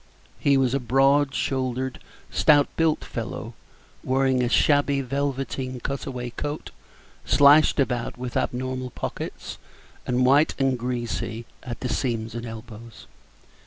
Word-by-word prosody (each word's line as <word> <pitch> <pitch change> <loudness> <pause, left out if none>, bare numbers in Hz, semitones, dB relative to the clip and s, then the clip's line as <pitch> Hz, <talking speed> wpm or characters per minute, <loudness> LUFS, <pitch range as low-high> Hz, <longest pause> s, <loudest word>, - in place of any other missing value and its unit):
He 140 -1 +3
was 130 -2 +2
a 140 - +2
broad 135 +3 +3
shouldered, 130 -1 -2 0.3
stout 145 -2 +4
built 160 -2 +1
fellow, - - -5 0.5
wearing 130 0 +2
a 120 - +1
shabby 145 +1 +3
velveteen 135 -1 -3
cut 140 +2 -4
away 125 -2 -5
coat, 145 +4 -5 0.5
slashed 145 +2 +5
about 125 -4 -1
with 125 -1 -6
abnormal 130 0 -2
pockets, - - -6 0.5
and 125 0 +2
white 140 +4 +4
and 135 -1 +2
greasy 120 -1 -3 0.2
at 120 -2 -7
the 125 - -2
seams 115 -4 -2
and 120 0 -5
elbows. 115 0 -10
130 Hz, 125 wpm, -25 LUFS, 125-140 Hz, 0.5 s, slashed